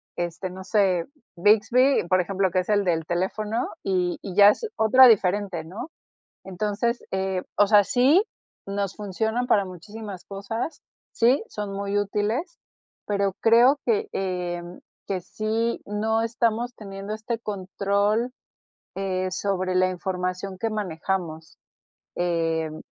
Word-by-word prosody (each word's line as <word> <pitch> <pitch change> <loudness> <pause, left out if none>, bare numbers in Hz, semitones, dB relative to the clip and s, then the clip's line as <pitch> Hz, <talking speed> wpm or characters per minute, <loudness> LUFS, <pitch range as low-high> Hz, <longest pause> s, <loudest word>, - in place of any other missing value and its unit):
este, 175 +2 -3
no 190 +1 -9
sé, 190 -4 +2 0.3
Bixby, 220 +6 +4
por 185 +1 +3
ejemplo, 190 +1 0
que 185 +1 +1
es 180 - -4
el 205 -1 +2
del 165 -3 0
teléfono, 210 +7 -2
y 180 -2 0
y 190 -3 -7
ya 205 0 +9
es 455 - -4
otra 255 +4 +7
diferente, 195 -5 +2
¿no? 205 - -8 0.5
Entonces, 210 +5 -2
eh, 190 -1 -1
o 205 - +5
sea, 205 -1 +6
sí, 280 +7 +4 0.5
nos 200 -1 -2
funcionan 220 +4 -2
para 205 -5 +3
muchísimas 195 +2 -9
cosas, 200 +9 -5 0.3
sí, 245 +4 +3
son 205 -1 -5
muy 200 +1 -2
útiles, 210 - -2 0.5
pero 200 -1 0
creo 240 +5 +5
que, 430 -2 +1
em, 175 -2 -4 0.3
que 190 -2 -2
sí 220 +5 -2
no 220 +2 0
estamos 235 +1 0
teniendo 200 0 -7
este 225 +2 -4
control, 205 +3 -1 0.6
eh, 185 -1 -1
sobre 185 -1 -1
la 185 0 +3
información 185 +1 -3
que 225 +3 -1
manejamos, 170 -5 -4 0.6
em 165 -2 -1
200 Hz, 130 wpm, -25 LUFS, 185-220 Hz, 0.6 s, ya